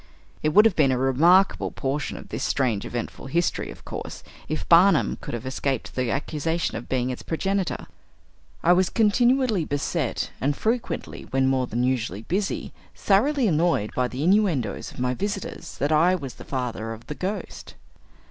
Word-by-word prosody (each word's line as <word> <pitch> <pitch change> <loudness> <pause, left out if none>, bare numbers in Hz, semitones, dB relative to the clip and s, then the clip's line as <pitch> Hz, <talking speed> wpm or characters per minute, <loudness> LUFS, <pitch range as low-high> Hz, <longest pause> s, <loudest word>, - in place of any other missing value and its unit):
It 155 - +2
would 210 +8 +6
have 220 -5 +4
been 140 -4 +4
a 130 - +1
remarkable 165 +9 +4
portion 140 +1 -3
of - - -11
"this - - -4
strange, 120 -7 0
eventful 120 +2 -5
history," 170 +5 0
of - - -12
course, - - -7 0.3
if 155 - -3
"Barnum" 180 +4 +5
could - - -5
have 120 +1 -6
escaped 130 -1 -2
the 125 -2 -1
accusation 155 +4 -1
of 115 +2 -7
being 130 -1 0
its 125 - -6
progenitor. 195 +3 -2 0.8
I 175 - +6
was 185 0 +3
continually 240 -1 +3
beset, 145 -1 -2
and 140 +2 0
frequently, 230 +2 -2
when 135 0 +2
more 130 -1 +1
than 120 +2 -1
usually 115 -5 -1
busy, 195 - -2 0.2
thoroughly 245 +6 +2
annoyed 160 - +1
by 125 0 +1
the 130 +3 -4
innuendoes 175 - +1
of - - -15
my 125 0 0
visitors, 200 +5 -5
that 145 +2 0
I 170 +4 +4
was 140 -8 -6
the - - -12
father 115 -4 -3
of 115 +1 -12
"the 150 - -5
Ghost." 190 +7 -5
150 Hz, 170 wpm, -25 LUFS, 125-190 Hz, 0.8 s, would